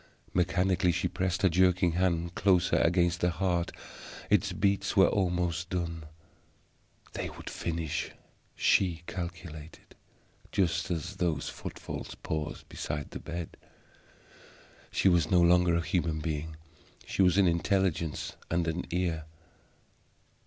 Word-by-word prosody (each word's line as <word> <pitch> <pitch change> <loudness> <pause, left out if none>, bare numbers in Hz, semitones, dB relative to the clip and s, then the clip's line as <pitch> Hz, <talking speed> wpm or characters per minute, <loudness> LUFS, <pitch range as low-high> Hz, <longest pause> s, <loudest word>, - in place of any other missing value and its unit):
Mechanically 90 0 +2
she 90 +1 0
pressed 95 0 -2
her - - +7
jerking 90 0 +3
hand 85 -1 0
closer 95 -3 +3
against 85 +1 +2
the 90 - +3
heart; 85 0 0 0.6
its - - +3
beats 100 +1 0
were 95 - +8
almost 90 -2 0
done. 85 -3 -3 1.1
They - - -3
would - - -9
finish, 80 -2 -2 0.5
she 85 -3 +2
calculated, 85 -3 -7 0.6
just 90 -4 +1
as 90 +3 -3
those 85 -6 0
footfalls - - -7
paused 75 -1 -4
beside 75 -1 -4
the - - -6
bed. 85 0 -6 1.3
She - - +2
was 85 -4 +4
no 90 - +5
longer 85 0 +5
a 85 - +2
human 85 -2 0
being; 80 0 -3 0.5
she - - -1
was 90 0 +4
an 100 -2 +5
Intelligence 85 -2 0
and 85 0 0
an 80 +2 -2
EAR. 85 -3 -1
85 Hz, 125 wpm, -30 LUFS, 80-90 Hz, 1.3 s, were